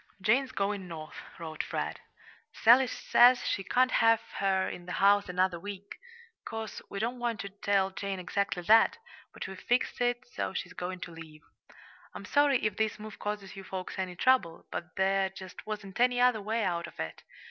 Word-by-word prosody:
Jane's 255 Hz, +7 st, +2 dB
going 200 Hz, -1 st, -2 dB
North 155 Hz, -2 st, -8 dB, 0.2 s
[wrote 160 Hz, -2 st, -5 dB
Fred]. -, -, -4 dB, 0.5 s
Sally 250 Hz, +3 st, +6 dB
says 245 Hz, +1 st, +5 dB
she 195 Hz, -, -1 dB
can't 255 Hz, +5 st, +2 dB
have 225 Hz, 0 st, +5 dB, 0.2 s
her 190 Hz, -1 st, +2 dB
in 175 Hz, 0 st, -7 dB
the 180 Hz, -, -4 dB
house 200 Hz, 0 st, +4 dB
another 180 Hz, -1 st, +1 dB
week. 200 Hz, +1 st, -8 dB, 0.4 s
'Course, 225 Hz, -1 st, -6 dB
we -, -, -6 dB
don't 235 Hz, +4 st, -2 dB
want 235 Hz, -3 st, -2 dB
to 200 Hz, -, -6 dB
tell 195 Hz, -1 st, +1 dB
Jane 195 Hz, 0 st, -4 dB
exactly 185 Hz, 0 st, -2 dB
that 225 Hz, -, +5 dB, 0.3 s
but -, -, -7 dB
we've 190 Hz, 0 st, -8 dB
fixed 245 Hz, 0 st, 0 dB
it 245 Hz, 0 st, 0 dB
so -, -, -3 dB
she's -, -, -4 dB
going 180 Hz, 0 st, -5 dB
to 175 Hz, -, -6 dB
leave. 160 Hz, -2 st, -12 dB, 0.7 s
I'm -, -, -7 dB
sorry 285 Hz, -5 st, +3 dB
if 210 Hz, -2 st, 0 dB
this 220 Hz, -1 st, 0 dB
move 215 Hz, 0 st, -9 dB
causes 205 Hz, -2 st, -4 dB
you 195 Hz, -, -8 dB
folks 185 Hz, 0 st, -6 dB
any 185 Hz, -1 st, -3 dB
trouble, 190 Hz, -7 st, +2 dB
but 175 Hz, +1 st, -6 dB
there 190 Hz, 0 st, +2 dB
just 190 Hz, +1 st, -11 dB
wasn't 210 Hz, -1 st, -6 dB
any 245 Hz, 0 st, +3 dB
other 245 Hz, -3 st, +4 dB
way 220 Hz, +2 st, -1 dB
out 170 Hz, -2 st, -1 dB
of 170 Hz, -, -15 dB
it. 80 Hz, 0 st, -5 dB
200 Hz, 185 wpm, -30 LUFS, 185-225 Hz, 0.7 s, Sally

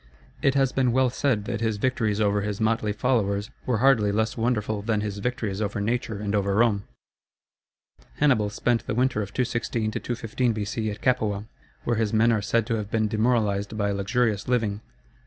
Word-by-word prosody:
It 135 Hz, 0 st, +2 dB
has 135 Hz, -2 st, +3 dB
been 130 Hz, -3 st, +1 dB
well 130 Hz, -1 st, +3 dB
said 125 Hz, -6 st, 0 dB
that 115 Hz, -1 st, -3 dB
his 110 Hz, -2 st, 0 dB
victories 110 Hz, -3 st, 0 dB
over 105 Hz, -1 st, +2 dB
his 105 Hz, 0 st, -3 dB
motley 110 Hz, -1 st, +1 dB
followers 105 Hz, -2 st, 0 dB, 0.2 s
were 125 Hz, -3 st, +2 dB
hardly 115 Hz, -4 st, +4 dB
less 110 Hz, +2 st, 0 dB
wonderful 110 Hz, -3 st, -1 dB
than 105 Hz, 0 st, 0 dB
his 105 Hz, -1 st, -4 dB
victories 110 Hz, -3 st, -2 dB
over 105 Hz, 0 st, -2 dB
nature 115 Hz, 0 st, -1 dB
and 100 Hz, 0 st, -3 dB
over 100 Hz, -1 st, +1 dB
Rome. 105 Hz, -3 st, +2 dB, 1.3 s
Hannibal 125 Hz, -8 st, +3 dB
spent 115 Hz, +2 st, 0 dB
the -, -, -1 dB
winter 125 Hz, -3 st, +1 dB
of 100 Hz, -1 st, -5 dB
216 115 Hz, -3 st, -1 dB
215 115 Hz, +1 st, -1 dB
B.C. 110 Hz, +1 st, -2 dB
at 105 Hz, -, -6 dB
Capua, 110 Hz, -5 st, +1 dB, 0.4 s
where 120 Hz, -2 st, 0 dB
his 110 Hz, -1 st, 0 dB
men 115 Hz, +2 st, +4 dB
are 110 Hz, -2 st, +1 dB
said 115 Hz, +1 st, +1 dB
to 115 Hz, -, -1 dB
have 105 Hz, -2 st, -4 dB
been 110 Hz, 0 st, +1 dB
demoralized 110 Hz, -2 st, 0 dB
by 100 Hz, -1 st, 0 dB
luxurious 100 Hz, +2 st, 0 dB
living. 110 Hz, -4 st, 0 dB
110 Hz, 180 wpm, -25 LUFS, 105-120 Hz, 1.3 s, hardly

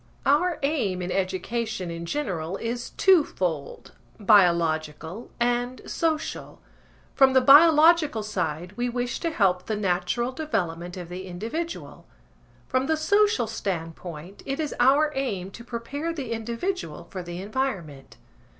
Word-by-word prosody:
Our 320 Hz, +4 st, +3 dB
aim 225 Hz, -, 0 dB
in 180 Hz, -, -3 dB
education 195 Hz, +1 st, -2 dB
in 170 Hz, 0 st, -6 dB
general 185 Hz, -, -2 dB
is 235 Hz, +1 st, -4 dB
two 375 Hz, -5 st, +5 dB
fold, 160 Hz, -, -4 dB, 0.3 s
biological 170 Hz, -2 st, +2 dB
and 245 Hz, +1 st, 0 dB
social. 320 Hz, -2 st, -2 dB, 0.5 s
From 270 Hz, -2 st, +5 dB
the 260 Hz, -, +7 dB
biological 305 Hz, -2 st, +6 dB
side 175 Hz, -4 st, -3 dB
we 245 Hz, +2 st, -1 dB
wish 245 Hz, 0 st, -2 dB
to 335 Hz, -, -1 dB
help 185 Hz, -, +1 dB
the 220 Hz, -, -1 dB
natural 195 Hz, +5 st, 0 dB
development 180 Hz, -, -3 dB
of 175 Hz, -2 st, -6 dB
the 185 Hz, +1 st, -7 dB
individual, 230 Hz, -, -5 dB, 0.6 s
from 260 Hz, +1 st, 0 dB
the 315 Hz, -, +2 dB
social 405 Hz, -, +3 dB
standpoint 175 Hz, -4 st, -5 dB
it 275 Hz, +2 st, -4 dB
is 305 Hz, -2 st, -2 dB
our 280 Hz, +5 st, +4 dB
aim 200 Hz, -9 st, -3 dB
to 235 Hz, -, -10 dB
prepare 250 Hz, +7 st, -4 dB
the 275 Hz, -8 st, -5 dB
individual 235 Hz, -, -3 dB
for 185 Hz, -, -5 dB
the 175 Hz, 0 st, -7 dB
environment. 190 Hz, -, -4 dB
230 Hz, 130 wpm, -25 LUFS, 180-275 Hz, 0.6 s, the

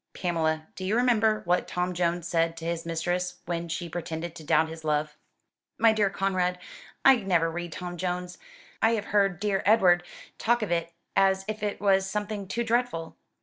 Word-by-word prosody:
"Pamela, 160 Hz, -3 st, 0 dB
do 185 Hz, -, -7 dB
you 195 Hz, +4 st, 0 dB
remember 220 Hz, -3 st, +3 dB
what 180 Hz, +1 st, +1 dB
Tom 180 Hz, 0 st, -1 dB
Jones 175 Hz, -1 st, 0 dB
said 165 Hz, -1 st, +1 dB
to 165 Hz, -, -7 dB
his 170 Hz, 0 st, -3 dB
mistress 175 Hz, +2 st, -1 dB
when 170 Hz, 0 st, -3 dB
she 170 Hz, +1 st, -3 dB
pretended 165 Hz, 0 st, -5 dB
to 165 Hz, -, -10 dB
doubt 160 Hz, +1 st, +3 dB
his 160 Hz, 0 st, -9 dB
love?" 150 Hz, 0 st, 0 dB, 0.6 s
"My 225 Hz, -1 st, +5 dB
dear 210 Hz, -2 st, +2 dB
Conrad, 185 Hz, -2 st, 0 dB, 0.5 s
I 270 Hz, -1 st, +8 dB
never 175 Hz, -6 st, +1 dB
read 175 Hz, 0 st, -5 dB
'Tom 175 Hz, +1 st, -6 dB
Jones,' 180 Hz, 0 st, -3 dB, 0.4 s
I 225 Hz, +1 st, +4 dB
have 210 Hz, -3 st, -1 dB
heard 195 Hz, -4 st, +3 dB
dear 200 Hz, -1 st, 0 dB
Edward 185 Hz, -4 st, +5 dB, 0.4 s
talk 240 Hz, 0 st, +2 dB
of 205 Hz, -, -3 dB
it 170 Hz, -1 st, 0 dB, 0.2 s
as 190 Hz, 0 st, +3 dB
if 215 Hz, 0 st, -4 dB
it 205 Hz, -1 st, -2 dB
was 195 Hz, -1 st, +3 dB
something 205 Hz, -1 st, -3 dB
too 235 Hz, +5 st, -1 dB
dreadful." 235 Hz, -9 st, -1 dB
180 Hz, 185 wpm, -27 LUFS, 170-205 Hz, 0.6 s, I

